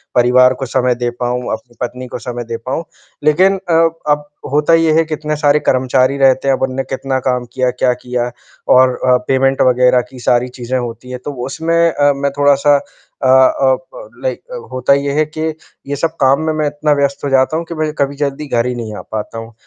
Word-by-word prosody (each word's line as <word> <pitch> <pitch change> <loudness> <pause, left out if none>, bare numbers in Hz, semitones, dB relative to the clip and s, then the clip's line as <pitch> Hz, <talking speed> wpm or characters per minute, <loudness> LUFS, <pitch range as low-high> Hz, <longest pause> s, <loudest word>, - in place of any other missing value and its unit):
परिवार 125 +1 +5
को - - -1
समय 125 -1 +1
दे 120 0 -2
पाऊँ, 125 0 -1
अपनी 130 -4 -8
पत्नी 125 +1 -4
को 120 - -6
समय 120 0 -5
दे 115 0 -5
पाऊँ, 135 +6 -2 0.4
लेकिन 185 +6 +3
अ, - - +2 0.4
अब 145 0 0 0.2
होता 150 +3 +2
ये 165 -1 +4
है 165 +1 +4
कि 155 - -5
इतने 150 0 -2
सारे 150 0 +3
कर्मचारी 130 +1 +2
रहते 135 0 +3
हैं 135 - +4
अब - - -10
उन्होंने 130 0 -1
कितना 135 0 -3
काम 125 -1 0
किया, 130 -1 +1
क्या 125 0 +1
किया 125 0 -3 0.4
और 130 0 +6 0.2
अ, 125 - +5
पेमेंट 135 0 +2
वग़ैरह 125 0 +4
की 130 - -12
सारी 120 +1 +1
चीज़ें 125 +1 -2
होती 120 +1 -7
हैं। 125 - -5
तो 145 - -3
उसमें 160 +5 -2 0.2
अ, 145 -1 +3
मैं 140 0 -1
थोड़ा-सा 145 0 +4
अ 135 - -7
अ, 130 0 +4 0.2
प - - -10
लाइक - - -2 0.3
होता 130 +1 +2
ये 140 0 0
है 155 - +3
कि, 155 +1 -8 0.5
ये 145 - -2
सब 165 +3 -2
काम 135 +3 +4
में 155 - 0
मैं 155 -1 -1
इतना 150 +1 -1
व्यस्त 140 -1 -1
हो - - -1
जाता 135 +3 +2
हूँ 170 - -4
कि 170 - -7
मैं 155 -1 -1
कभी 140 0 0
जल्दी 145 +1 -3
घर 120 -3 0
ही 125 - -2
नहीं 110 -3 -6
आ - - -7
पाता 110 +1 -5
हूँ। 115 +1 -10
135 Hz, 220 wpm, -16 LUFS, 125-145 Hz, 0.5 s, और